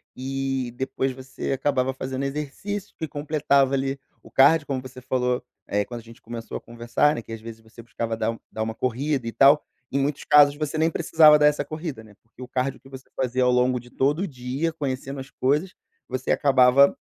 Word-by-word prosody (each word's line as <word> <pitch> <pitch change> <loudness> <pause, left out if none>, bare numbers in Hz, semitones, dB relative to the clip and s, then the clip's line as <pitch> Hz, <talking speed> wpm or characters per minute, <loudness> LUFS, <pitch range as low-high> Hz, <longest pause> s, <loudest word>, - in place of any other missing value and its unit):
e 135 -1 -3
depois 130 +1 -2
você 130 +1 -6
acabava 135 -1 0
fazendo 130 +1 -4
exercício 150 +9 -5
que 160 - -4
completava 145 -2 +1
ali 135 0 -1 0.2
o - - -16
cardio, 145 +3 +5
como 135 -2 -2
você 130 0 -11
falou, 125 -1 -1 0.2
eh, 105 0 +1
quando 120 -1 -7
a - - -21
gente 115 +1 -15
começou 115 0 -6
a - - -11
conversar, 120 +6 0
né, - - -4
que 115 - -13
às 115 - -7
vezes 115 0 -10
você 110 +1 -14
buscava 115 0 -4
dar 110 0 0
um 115 - -9
dar 110 - -5
uma 110 0 -4
corrida 130 +2 -1
e - - -2
tal. 140 +5 +5 0.3
Em 140 - +1
muitos 140 +1 -1
casos, 145 -1 +6
você 150 +1 -3
nem 160 +1 +3
precisava 155 -1 +6
dar 150 - +6
essa 145 -1 +1
corrida, 155 -5 -6
né, 110 -1 -17
porque 115 +2 -18
o 125 - -7
cardio 130 +1 -2
que - - -18
você 130 0 -11
fazia 130 0 0
ao 125 - +4
longo 125 0 +2
de 120 +1 -15
todo 140 +5 +1
o 195 - -1
dia, 135 +3 -3
conhecendo 135 -2 -4
as 135 +1 -8
coisas, 150 +8 0 0.3
você 130 0 -2
acabava 135 0 +5
135 Hz, 215 wpm, -24 LUFS, 125-145 Hz, 0.3 s, casos